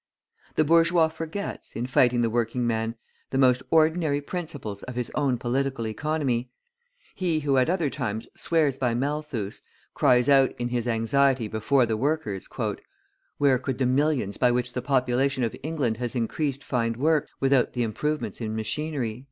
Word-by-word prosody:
The 155 - +4
bourgeois 165 +1 +4
forgets, 165 +5 -6
in 120 - -2
fighting 125 -1 +3
the 115 - +2
working 120 +1 0
man, 115 0 -1 0.3
the 135 - -2
most 130 -1 +4
ordinary 160 -2 +3
principles 145 - -6
of 125 - -8
his 125 -1 -3
own 140 -4 +1
Political 130 0 -1
Economy. 130 0 -1 0.6
He 170 -5 0
who 140 -2 +1
at 130 - +2
other 170 -6 +1
times 110 -6 -3
swears 150 -5 +1
by 125 -3 +1
Malthus, 140 -6 -3 0.3
cries 125 -1 +3
out 135 -2 +4
in 120 0 -2
his 120 -1 -2
anxiety 120 +1 +2
before 120 +5 +2
the 110 -1 -1
workers: 125 -7 -1 0.9
"Where 140 -3 +3
could 130 -1 -3
the 130 - +1
millions 130 -5 +1
by 125 - +4
which 125 0 -1
the 125 - -2
population 130 0 +1
of 115 - -1
England 140 -7 -1
has 120 +1 -3
increased 135 +4 -2
find 115 -3 -1
work, 155 +2 +2
without 135 -2 +2
the 125 - 0
improvements 120 0 -2
in 110 -1 -3
machinery?" 120 +1 -2
130 Hz, 160 wpm, -26 LUFS, 120-150 Hz, 0.9 s, The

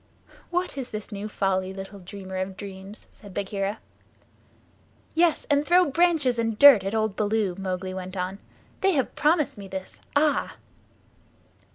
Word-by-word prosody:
"What 355 -5 -2
is 255 -2 -5
this 215 0 -7
new 205 +1 -5
folly, 190 -2 -1
little 195 +1 -8
dreamer 190 0 -8
of 190 0 -3
dreams?" 195 +1 -9
said 200 -3 -14
Bagheera. 200 +1 -2 1.4
"Yes, 330 -1 +2
and 285 -1 +3
throw 355 +3 +5
branches 315 -7 +3
and 225 -2 0
dirt 275 -7 +9
at 195 +3 -2
old 220 -2 0
Baloo," 210 -2 0
Mowgli 185 -1 -3
went 185 0 -6
on. 185 +2 -3 0.4
"They 390 0 +3
have 270 -5 0
promised 305 -7 +1
me 200 - -8
this. 190 0 -7
Ah!" 295 +1 +2
205 Hz, 150 wpm, -26 LUFS, 190-280 Hz, 1.4 s, dirt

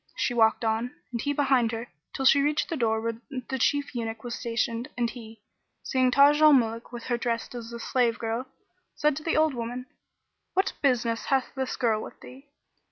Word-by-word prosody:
She 245 - 0
walked 225 0 +3
on 225 +2 -1 0.2
(and 235 -2 -3
he 285 - 0
behind 270 -5 +2
her) 230 +2 -4 0.2
till 270 - -3
she 280 +2 +6
reached 295 +5 0
the 335 - -1
door 225 -5 +1
where 230 0 -3 0.3
the 265 - -2
Chief 285 +3 +1
Eunuch 225 -2 -4
was 240 -1 -5
stationed 235 0 -2
and 240 -1 +1
he, 225 -3 -10 0.4
seeing 255 -1 +2
Taj 285 +3 +5
al 305 -1 +8
Muluk 230 -3 +1
with 240 -1 -7
her 240 -1 -1
dressed 235 -1 -2
as 235 -1 -7
a 235 - -6
slave 240 -1 +1
girl, 230 +3 -3 0.5
said 300 -1 +2
to - - -5
the 330 - 0
old 310 -1 +3
woman, 245 +1 -5 0.7
"What 380 +1 +2
business 240 -4 +1
hath 265 -2 0
this 265 -1 -3
girl 225 -3 +1
with - - -10
thee?" 270 +3 -14
245 Hz, 200 wpm, -27 LUFS, 230-270 Hz, 0.7 s, al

